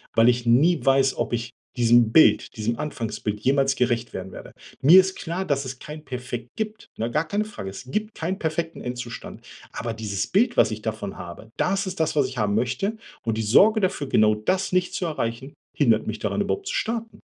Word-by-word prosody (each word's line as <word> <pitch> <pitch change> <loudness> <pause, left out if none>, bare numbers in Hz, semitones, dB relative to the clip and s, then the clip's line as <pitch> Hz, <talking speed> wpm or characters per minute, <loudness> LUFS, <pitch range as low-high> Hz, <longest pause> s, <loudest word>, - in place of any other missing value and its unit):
weil 115 +1 +6
ich 120 0 +1
nie 150 +9 +4
weiß, 135 0 +3
ob - - -2
ich 120 +1 -2 0.3
diesem 120 -1 +5
Bild 155 - +4
diesem 115 +2 -1
Anfangsbild 115 -7 -3
jemals 135 +3 +2
gerecht 120 -1 0
werden 95 0 -6
werde. - - -10 0.3
Mir 170 +7 +9
ist 190 0 +2
klar, 180 +2 -4
dass 140 -3 0
es 130 -1 -7
kein 150 0 -9
Perfekt 125 -3 -6
gibt, 215 -1 -4
ne? 115 +2 -2
Gar 150 +6 0
keine 205 +6 -1
Frage. 205 - -7
Es 95 +6 -9
gibt 215 +6 -2
keinen 180 +4 -3
perfekten 165 +1 -3
Endzustand. 125 -1 -7 0.3
Aber 115 -1 -4
dieses 105 -3 -3
Bild, 235 +6 +2
was - - +5
ich 110 0 -5
davon 110 -3 -4
habe, 90 +5 -9
das 195 +1 0
ist 185 -2 -5
das, 160 - +1
was 140 -3 +3
ich 130 -1 -9
haben 105 -1 +1
möchte, 195 - -1 0.3
und 115 -1 -1
die - - 0
Sorge 205 - +5
dafür, 180 -7 -1
genau 110 0 +4
das 185 - -1
nicht 185 0 +1
zu 180 - -2
erreichen, 135 -3 -3 0.2
hindert 115 -7 +2
mich 110 0 -3
daran, 205 - -1
überhaupt 390 - -2
zu - - -2
starten. 225 0 -3
130 Hz, 210 wpm, -24 LUFS, 115-180 Hz, 0.3 s, Mir